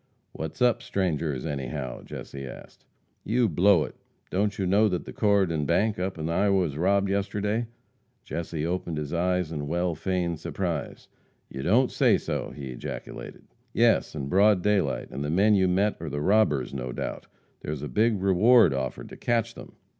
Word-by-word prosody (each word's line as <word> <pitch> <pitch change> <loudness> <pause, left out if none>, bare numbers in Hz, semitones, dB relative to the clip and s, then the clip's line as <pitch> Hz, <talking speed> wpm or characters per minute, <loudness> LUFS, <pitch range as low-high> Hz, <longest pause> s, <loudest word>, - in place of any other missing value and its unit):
"What's 80 - -4
up, 120 -1 +3
strangers, 80 - -1
anyhow?" 70 -3 -4
Jesse 70 -1 -8
asked. - - -12 0.4
"You 120 +2 +2
blow 90 -1 +4
it! - - -7 0.4
Don't 105 +2 0
you 95 - -1
know 105 +4 +4
that 90 -2 -2
the - - -8
Corydon 95 -8 +2
bank, 105 +4 +1
up 95 0 -2
in 80 0 -3
Iowa, 100 +4 +2
was 80 -6 -2
robbed 100 +5 +2
yesterday." 105 +3 -1 0.6
Jesse 80 -2 -4
opened 85 -2 -2
his 75 0 -4
eyes 90 -1 0
in 75 -3 -4
well 85 +2 0
feigned 85 0 -2
surprise. 85 -3 -4 0.4
"You 65 - -5
don't 120 - +3
say - - +4
so!" - - -3
he 70 -3 -7
ejaculated. - - -7 0.3
"Yes, - - +3
in 70 -3 -4
broad 100 +2 +4
daylight, 100 -9 0
and 70 +2 -4
the 75 - -2
men 100 +7 +4
you 95 -2 +4
met 100 +4 +1
are 80 -1 -5
the 75 +1 -3
robbers, 75 - +2
no 65 -2 -4
doubt. - - -5 0.3
There's 75 -1 -5
a - - -3
big 105 - +1
reward 105 - +5
offered 65 -2 -4
to - - -10
catch 115 -1 0
them." - - -12
90 Hz, 175 wpm, -26 LUFS, 75-100 Hz, 0.6 s, reward